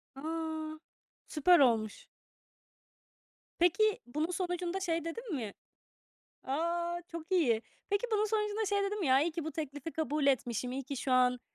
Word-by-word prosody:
A! 315 +1 -4 0.5
Süper 345 +3 +5
olmuş. 225 -5 +2 1.5
Peki, 405 +5 +4
bunun 305 +8 -2
sonucunda 355 +1 -2
şey 335 -3 -1
dedin 410 +1 -4
mi 220 -6 -4 0.9
A, 340 +4 -1
çok 335 +2 -7
iyi. 240 -11 +3 0.3
Peki, 405 +4 +1
bunun 425 0 +3
sonucunda 425 0 0
şey 405 0 +1
dedin 410 +1 -1
mi? 335 - 0
"Ya, 260 +1 +5
iyi 335 0 0
ki 325 -1 -4
bu 315 - -4
teklifi 295 0 -5
kabul 300 -2 0
etmişim, 250 -2 +1
iyi 270 +1 -3
ki 275 +1 -5
şu 260 +1 -1
an, 250 -1 +4
320 Hz, 150 wpm, -32 LUFS, 275-360 Hz, 1.5 s, Süper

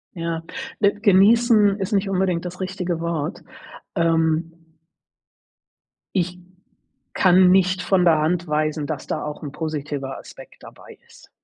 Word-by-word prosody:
Ja, 165 -1 -3 0.4
äh, 200 -1 +4
genießen 210 +1 +4
ist 195 +2 -4
nicht 195 -1 +1
unbedingt 185 -3 0
das 180 +1 -7
richtige 185 -2 -3
Wort, 165 0 -3 0.5
ähm 165 -1 +1 1.6
Ich 180 -1 -1 0.7
kann 185 0 +5
nicht 185 0 +3
von 180 0 +2
der 165 -3 +4
Hand 170 +3 -1
weisen, 150 0 -1
dass 150 -4 -5
da - - -3
auch 150 0 -7
'n 145 - -6
positiver 145 -3 -5
Aspekt - - -14
dabei - - -14
ist. - - -19
175 Hz, 130 wpm, -22 LUFS, 160-190 Hz, 1.6 s, kann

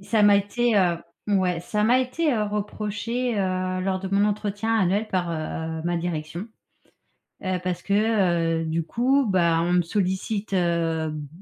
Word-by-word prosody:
ça 215 +2 +1
m'a 205 -1 +7
été, 220 +3 +1
heu 175 -4 +3 0.3
ouais, 185 -4 +1
ça 210 +4 -1
m'a 245 +4 +4
été, 285 +4 0
heu, 220 - +1
reproché, 210 +3 -2
heu, 185 -1 -1
lors 190 0 -1
de 190 - -4
mon 200 +1 +3
entretien 210 +2 -1
annuel 205 +1 +2
par, 175 -2 -1
heu, 160 0 -4
ma 175 0 0
direction. 170 +2 -4 1.0
Heu, 185 -1 -1
parce 180 -1 -2
que, 200 - -2 0.7
heu, 165 - -3
du 160 +1 -1
coup, 260 - +2
bah, 170 -4 +3
on 175 +1 0
me 180 - +4
sollicite, 195 +3 -2
hem, 165 -4 0
190 Hz, 165 wpm, -24 LUFS, 170-210 Hz, 1.0 s, m'a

